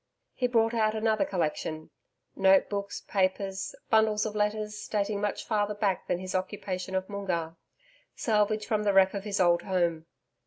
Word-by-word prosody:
He 250 - 0
brought 225 -1 +2
out 220 -1 +1
another 220 -1 +1
collection 155 -2 -3 0.4
notebooks, 195 +1 +2
papers, 195 0 -1 0.2
bundles 220 -1 +3
of 215 - -3
letters 210 0 -2
dating 205 -1 -1
much 205 -1 -2
further 210 -2 0
back 200 -3 -1
than 180 - 0
his 185 +1 -6
occupation 185 0 -3
of 190 0 -1
Moongarr 175 -5 -3 0.6
salvage 215 -1 +1
from 215 -1 0
the 205 -1 +1
wreck 190 0 +5
of 200 0 -5
his 205 -1 -2
old 175 -2 +4
home. 170 -4 -1
200 Hz, 155 wpm, -28 LUFS, 185-215 Hz, 0.6 s, wreck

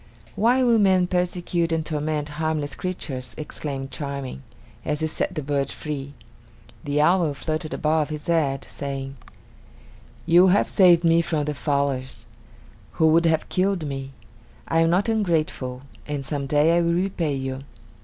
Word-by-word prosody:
"Why 245 +4 +3
will 235 -2 +4
men 190 -3 +4
persecute 175 -1 -1
and 160 -1 0
torment 150 -1 -2
harmless 155 -2 -1
creatures!" 140 -8 -5
exclaimed 140 -3 -5
Charming, 140 - -5 0.4
as 150 +1 -2
he - - +1
set 160 +3 -2
the 155 - -3
bird 140 -1 -1
free. 145 -2 -6 0.7
The 145 +1 -1
owl 165 -1 +3
fluttered 155 +2 -3
above 155 0 +1
his 150 -1 -6
head, 145 -5 0
saying: 135 -1 -5 1.1
"You 175 +2 +6
have 190 +2 +3
saved 175 -3 +5
me 165 0 +4
from 155 -3 -1
the 150 - -2
fowlers, 140 -2 -2 0.7
who 160 -1 +3
would 165 +1 +4
have 160 -1 +1
killed 185 -3 0
me. 135 -1 -5 0.5
I 165 - +2
am 165 0 +4
not 180 +5 +2
ungrateful, 160 - -1 0.2
and 145 -2 -3
some 140 -1 -3
day 150 +4 +3
I 170 - +3
will 170 0 +1
repay 175 -5 0
you!" 135 0 -4
155 Hz, 155 wpm, -24 LUFS, 140-170 Hz, 1.1 s, You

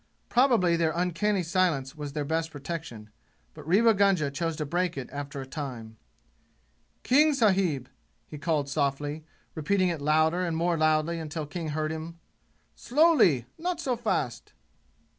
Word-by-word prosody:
Probably 235 -9 +3
their 165 -1 +1
uncanny 180 +3 0
silence 165 -6 0
was 145 -2 -6
their 150 -1 -2
best 160 +2 -1
protection; 145 -8 -7 0.4
but - - -12
Rewa 225 +6 +5
Gunga 195 -8 +2
chose 165 +3 -2
to 150 - -3
break 175 +2 -1
it 130 - -5
after 140 -1 -6
a - - -7
time. 130 -6 -7 1.1
"King 295 +3 +4
sahib!" 190 - +2 0.4
he 150 - -10
called 150 -3 0
softly, 145 +1 -2 0.3
repeating 185 +4 +1
it 165 -4 -3
louder 155 +4 +2
and 170 -2 -1
more 170 +1 +1
loudly 155 +1 +1
until 155 -1 -5
King 160 +3 -5
heard 155 +1 -2
him. 160 +1 -6 0.6
"Slowly! 245 - +3
Not 350 0 -2
so 260 -7 -1
fast!" 125 - -3
160 Hz, 145 wpm, -27 LUFS, 145-185 Hz, 1.1 s, Rewa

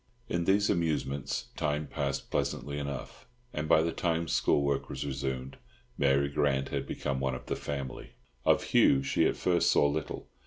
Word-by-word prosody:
In 85 -1 -1
these 100 +3 +3
amusements 75 -6 -1
time 75 0 -1
passed 70 -2 -3
pleasantly 70 +2 -1
enough, 70 - -6 0.3
and 75 +1 -3
by 80 - +6
the 85 - 0
time 85 0 0
school 70 - +2
work 70 -1 0
was - - -4
resumed 65 -1 -3 0.4
Mary 70 -4 +3
Grant 70 -1 +1
had - - -3
become 70 -1 -2
one 65 -1 -1
of 65 - -8
the - - -2
family. 70 -2 -5 0.3
Of - - +4
Hugh 70 0 +4
she - - +2
at - - 0
first 90 -2 +2
saw - - +4
little. 75 +1 -3
70 Hz, 170 wpm, -30 LUFS, 70-80 Hz, 0.4 s, by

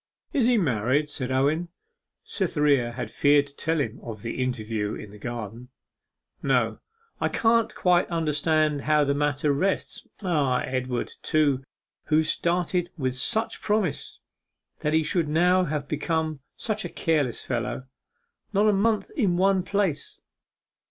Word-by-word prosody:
'Is 260 -6 +3
he 245 -1 +4
married?' 140 - +1
said 130 -3 -3
Owen. 145 +6 +1 0.6
Cytherea 145 - +1
had 125 +1 -5
feared 145 0 +4
to 140 0 -16
tell 160 +2 0
him 125 -4 -2
of 110 -3 -8
the 115 +2 -3
interview 110 -4 -2
in 105 - -9
the 105 - -13
garden. 120 +1 -6 0.7
'No. - - +1 0.4
I - - +1
can't 230 0 +2
quite 180 -1 +3
understand 155 -2 +1
how 150 0 +3
the 140 0 +1
matter 145 0 +1
rests.... 190 +8 -1 0.2
Ah! 145 -8 +1
Edward, 130 -1 -2
too, 145 -4 +2 0.4
who 155 0 +3
started 175 +2 0
with 130 -4 -1
such 220 - -1
promise; 205 -8 -1 0.6
that 150 - -1
he 160 0 +4
should 160 +1 0
now 180 +4 +4
have 150 -3 -3
become 155 0 -1 0.2
such 215 -2 -2
a 175 - -4
careless 150 -9 0
fellow 120 0 -2 0.7
not 205 +2 +4
a 210 - +5
month 215 - +1
in 205 - +1
one 190 0 +3
place. 185 -6 -2
150 Hz, 145 wpm, -26 LUFS, 130-180 Hz, 0.7 s, a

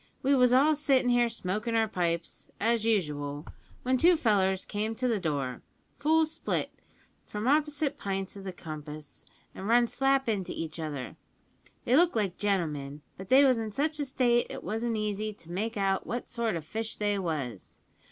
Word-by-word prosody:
We 275 +2 +4
was 250 -2 +5
all 280 +5 +5
sittin' 275 -4 +2
here 240 -1 +3
smokin' 220 +2 -2
our 225 -1 +3
pipes, 170 -4 -2
as 225 0 +1
usual, 150 -9 -1 0.4
when 255 +1 +2
two 345 +5 +5
fellers 190 - +2
came 215 +2 -2
to 250 +3 -1
the 225 -4 +1
door, 140 -7 -2 0.4
full 320 +2 +4
split, 310 - -2 0.5
from 210 +3 -4
opposite 295 0 +1
pints 195 0 -3
o' 200 - -8
the 190 -1 -5
compass, 155 -3 -9 0.3
an' 190 - -7
run 240 +3 +5
slap 270 +2 +1
into 200 -5 -1
each 165 0 -4
other. 145 -5 -5 0.7
They 245 - +3
looked 340 0 +4
like 200 -5 0
gentlemen; 150 -8 -1
but 190 +1 -10
they 270 +2 +7
was 255 -4 +4
in 220 -1 -3
such 300 +7 -1
a 290 - 0
state 245 -3 +2
it - - -7
wasn't 225 +1 -2
easy 215 0 -2
to 170 -4 -14
make 215 +5 -2
out 195 -1 0
what 240 +1 -3
sort 230 -4 -1
o' 165 - -3
fish 220 +8 -3
they 205 -1 0
was. 145 - -4
215 Hz, 180 wpm, -29 LUFS, 180-250 Hz, 0.7 s, they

